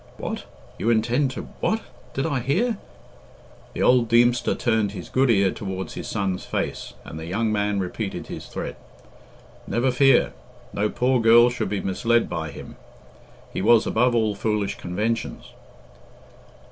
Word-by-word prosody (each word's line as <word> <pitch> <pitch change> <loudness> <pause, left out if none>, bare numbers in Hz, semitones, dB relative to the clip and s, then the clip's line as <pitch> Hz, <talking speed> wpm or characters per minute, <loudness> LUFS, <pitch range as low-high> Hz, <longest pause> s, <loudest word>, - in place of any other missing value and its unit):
"What? - - -5 0.3
You 115 - 0
intend 120 +5 +2
to - - -4 0.2
what? 220 0 0 0.3
Did 135 - 0
I 145 -5 0
hear 195 - 0 0.5
" - - -25
The - - -1
old 125 -2 +4
Deemster 120 +1 +3
turned 110 -4 +1
his 90 -4 -8
good 130 0 +2
ear 100 -4 +4
towards 95 -3 -5
his - - -6
son's 95 -2 -2
face, - - -4
and 80 - -8
the 80 - -7
young 110 +5 0
man 105 -1 0
repeated 95 +2 -4
his - - -8
threat. - - -6 0.9
Never 120 +5 +1
fear! 135 0 +4 0.4
No 105 +1 0
poor 125 +1 +1
girl 120 +2 +7
should 120 - -2
be 100 -1 -2
misled 115 +5 +1
by 80 -2 -4
him. - - -10 0.8
He - - -2
was 110 +2 +5
above 120 +2 +2
all 110 -2 +2
foolish 105 -1 -1
conventions. 105 +6 -3
115 Hz, 155 wpm, -24 LUFS, 100-125 Hz, 0.9 s, girl